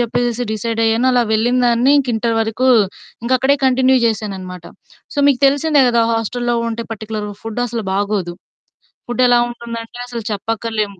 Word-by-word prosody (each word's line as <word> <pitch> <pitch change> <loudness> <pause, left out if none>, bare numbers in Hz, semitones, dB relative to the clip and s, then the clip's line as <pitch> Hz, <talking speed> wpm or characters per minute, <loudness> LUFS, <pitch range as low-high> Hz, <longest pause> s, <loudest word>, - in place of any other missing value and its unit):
చెప్పేసేసి 240 0 -1
డిసైడయ్యాను. 225 +2 0
అలా 245 -1 +3
వెళ్ళినదాన్ని 240 +2 +2
ఇంక 270 -3 -1
ఇంటర్ 230 +1 0
వరకు 225 +4 0 0.6
ఇంకక్కడే 260 +3 +2
కంటిన్యూ 260 0 +3
జేశాననమాట. 190 -5 -3 0.5
సో - - -5
మీకు 275 -3 +3
తెలిసిందే 285 +1 +3
కదా! 235 -1 +2
హాస్టల్‌లో 240 +2 -1
ఉంటే 230 0 -4
పర్టిక్యులర్‌గా 215 -1 -6
ఫుడ్డు 225 +2 -5
అసలు 230 -1 -4
బాగోదు. 200 -3 -1 0.7
ఫుడ్డు 240 +1 -1
ఎలా 245 - +5
ఉంటుందంటే 235 -1 -8
అసలు 240 -1 -5
చెప్పక్కర్లేము. 215 -1 -3
230 Hz, 135 wpm, -17 LUFS, 220-245 Hz, 0.7 s, ఎలా